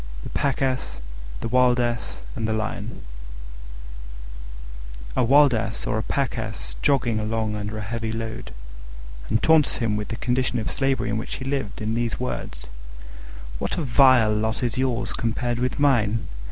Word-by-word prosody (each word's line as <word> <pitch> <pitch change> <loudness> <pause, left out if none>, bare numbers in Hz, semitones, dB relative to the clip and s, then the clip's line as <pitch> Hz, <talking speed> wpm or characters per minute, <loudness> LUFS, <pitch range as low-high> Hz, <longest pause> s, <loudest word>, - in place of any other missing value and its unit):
THE - - -6
PACK 140 -1 0
ASS, 130 - -1 0.4
THE - - -2
WILD 125 +1 +4
ASS, 120 - -2
AND 110 - -2
THE 110 - 0
LION 110 - -4 2.1
A - - +3
Wild 140 +2 +6
Ass 110 -2 -1
saw - - -1
a 110 - 0
Pack 135 +1 -1
Ass 85 - +1
jogging 120 -5 +2
along 110 0 -1
under 105 +1 -4
a - - -4
heavy 115 +1 -3
load, 110 - -5 0.8
and 110 - +1
taunted 160 -2 +5
him 115 -3 0
with 105 0 -3
the 115 - -4
condition 125 +2 0
of 110 - -2
slavery 135 -4 0
in 110 - 0
which 115 - -5
he 130 - -6
lived, 135 -7 -3
in 110 +1 -1
these 115 0 -1
words: 125 - -4 0.9
"What - - -2
a 170 - -1
vile 125 -4 +5
lot 110 +3 -1
is 120 -2 0
yours 125 -2 0
compared 120 +1 -1
with 125 +2 -1
mine! 115 -6 +2
115 Hz, 165 wpm, -24 LUFS, 110-130 Hz, 2.1 s, Wild